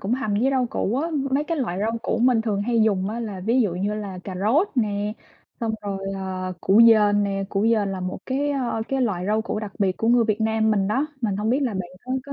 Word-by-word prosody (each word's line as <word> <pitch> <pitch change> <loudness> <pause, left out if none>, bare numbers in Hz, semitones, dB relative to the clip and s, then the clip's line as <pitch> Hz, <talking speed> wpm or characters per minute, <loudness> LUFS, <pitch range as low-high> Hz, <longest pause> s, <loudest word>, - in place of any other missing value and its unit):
cũng 215 +5 0
hầm 215 -6 -2
với 250 +6 +2
rau 260 -2 +1
củ 225 +6 -1
á. 325 +4 -1 0.2
Mấy 280 +3 +1
cái 330 +1 -2
loại 190 -8 -2
rau 225 +3 -1
củ 225 - -1
mình 245 -3 +4
thường 205 -3 -1
hay 230 0 +2
dùng 200 -3 +1
á 230 +2 -4
là 205 -5 -5
ví 230 +7 +2
dụ 200 -7 +1
như 200 +3 -1
là 200 -3 -5
cà 190 - -6
rốt 285 - +3
nè, 210 -3 0 0.5
xong 225 -1 -1
rồi, 200 -1 -3 0.2
ờ, 185 -1 -4
củ 200 +4 +4
dền 210 -2 +5
nè. 195 0 -2
Củ 195 0 -1
dền 210 -4 +2
là 185 - -4
một 185 0 -4
cái, 280 +2 0
ơ, 250 -5 -1
cái 270 0 0
loại 185 -6 -1
rau 215 +2 +1
củ 220 - -3
đặc 210 -3 -6
biệt 190 -2 +1
của 225 - 0
người 240 -1 +5
Việt 215 0 -1
Nam 220 0 +2
mình 195 -2 +1
đó. 265 +8 +1
Mình 205 -5 -1
hông 215 +2 -1
biết 260 - +2
là 235 -6 -1
bạn 180 -2 -4
có 255 - -4
có 280 - -6
215 Hz, 270 wpm, -23 LUFS, 200-240 Hz, 0.5 s, dền